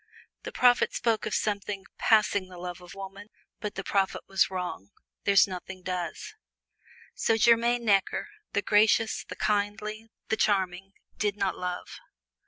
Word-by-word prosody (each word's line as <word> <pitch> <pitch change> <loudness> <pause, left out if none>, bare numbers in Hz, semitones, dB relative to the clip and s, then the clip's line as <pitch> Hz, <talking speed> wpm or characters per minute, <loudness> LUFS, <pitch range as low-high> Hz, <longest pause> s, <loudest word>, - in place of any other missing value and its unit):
The - - -7
prophet 245 - +4
spoke 225 -2 0
of - - -1
something 200 -1 -2
"passing 205 -3 +3
the 180 - -11
love 180 0 -6
of 180 +1 -12
woman," 195 +1 -9 0.3
but 210 -1 -5
the 195 - -4
prophet 195 -1 0
was 195 -1 +2
wrong 180 - -5 0.4
there's 200 -1 +6
nothing 185 0 -8
does. 180 -2 -4 0.8
So 225 - +1
Germaine 235 +1 +4
Necker, 200 - +2 0.3
the 205 - +1
gracious, 215 +2 +3
the - - -9
kindly, 210 +1 -1 0.2
the 220 - +1
charming, 195 -2 0 0.3
did 205 -1 0
not 195 -2 0
love. 180 0 -5
200 Hz, 145 wpm, -28 LUFS, 185-215 Hz, 0.8 s, there's